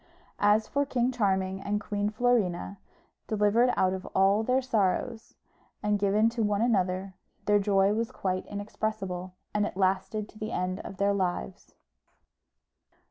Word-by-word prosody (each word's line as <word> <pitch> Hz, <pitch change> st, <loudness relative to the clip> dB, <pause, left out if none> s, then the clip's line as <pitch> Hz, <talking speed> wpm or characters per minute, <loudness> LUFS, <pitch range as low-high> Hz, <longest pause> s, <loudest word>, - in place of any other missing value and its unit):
As 210 Hz, +1 st, +3 dB
for 285 Hz, 0 st, +1 dB
King 255 Hz, -3 st, 0 dB
Charming 190 Hz, -5 st, 0 dB
and 205 Hz, +1 st, -1 dB
Queen 205 Hz, 0 st, -2 dB
Florina, 210 Hz, -5 st, 0 dB, 0.5 s
delivered 215 Hz, +3 st, +3 dB
out 185 Hz, 0 st, +3 dB
of 190 Hz, -1 st, -5 dB
all 195 Hz, +2 st, +4 dB
their 255 Hz, +3 st, +2 dB
sorrows, 230 Hz, -1 st, -1 dB, 0.5 s
and 210 Hz, 0 st, +1 dB
given 205 Hz, +2 st, +3 dB
to 230 Hz, 0 st, -3 dB
one 210 Hz, 0 st, +1 dB
another, 190 Hz, -4 st, 0 dB, 0.3 s
their 205 Hz, 0 st, +4 dB
joy 195 Hz, 0 st, +3 dB
was 225 Hz, +1 st, -1 dB
quite 185 Hz, -1 st, -2 dB
inexpressible, 200 Hz, -3 st, -4 dB, 0.2 s
and 210 Hz, -, +1 dB
it 205 Hz, -, -3 dB
lasted 195 Hz, +2 st, 0 dB
to 215 Hz, -, -16 dB
the 215 Hz, +1 st, -4 dB
end 185 Hz, -1 st, -2 dB
of 195 Hz, -, -8 dB
their 200 Hz, 0 st, +2 dB
lives. 180 Hz, -, -3 dB
205 Hz, 145 wpm, -28 LUFS, 190-220 Hz, 0.5 s, all